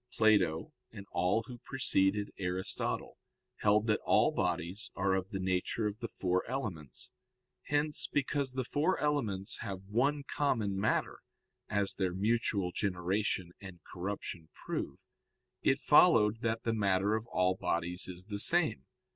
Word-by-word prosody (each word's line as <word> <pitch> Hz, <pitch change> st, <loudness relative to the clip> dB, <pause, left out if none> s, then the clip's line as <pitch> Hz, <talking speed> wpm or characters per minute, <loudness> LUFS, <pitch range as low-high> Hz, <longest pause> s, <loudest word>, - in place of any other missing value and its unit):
Plato 100 Hz, -8 st, +2 dB, 0.2 s
and 100 Hz, -, -9 dB
all 90 Hz, +6 st, +1 dB
who 120 Hz, +2 st, -10 dB
preceded 105 Hz, -6 st, +1 dB
Aristotle 90 Hz, 0 st, -2 dB, 0.4 s
held 105 Hz, +1 st, +3 dB
that 105 Hz, -2 st, +2 dB
all -, -, +4 dB
bodies 95 Hz, +8 st, -2 dB
are 95 Hz, 0 st, +1 dB
of 95 Hz, 0 st, -1 dB
the 95 Hz, -, -4 dB
nature 95 Hz, +4 st, -1 dB
of 105 Hz, +1 st, -3 dB
the 115 Hz, -, -4 dB
four 90 Hz, -3 st, -1 dB
elements. 95 Hz, -, -5 dB, 0.6 s
Hence 150 Hz, +1 st, +1 dB
because 140 Hz, -1 st, -1 dB
the 130 Hz, 0 st, -1 dB
four 150 Hz, +8 st, +1 dB
elements 115 Hz, -11 st, -1 dB
have 95 Hz, -1 st, -5 dB
one 135 Hz, +9 st, 0 dB
common 115 Hz, -9 st, 0 dB
matter, 100 Hz, +3 st, 0 dB, 0.5 s
as 100 Hz, -2 st, +1 dB
their 95 Hz, -2 st, -1 dB
mutual 100 Hz, -2 st, 0 dB
generation 95 Hz, -1 st, -1 dB
and 95 Hz, -3 st, -10 dB
corruption 90 Hz, -3 st, -6 dB
prove, -, -, -4 dB, 0.6 s
it 135 Hz, -, +3 dB
followed 115 Hz, -, +5 dB
that 115 Hz, -1 st, -1 dB
the 115 Hz, -, 0 dB
matter 100 Hz, -1 st, +2 dB
of 110 Hz, +1 st, -2 dB
all 90 Hz, -3 st, +2 dB
bodies 90 Hz, 0 st, -1 dB
is 90 Hz, 0 st, -8 dB
the 105 Hz, -1 st, -5 dB
same. 170 Hz, +7 st, +3 dB
100 Hz, 140 wpm, -32 LUFS, 95-115 Hz, 0.6 s, followed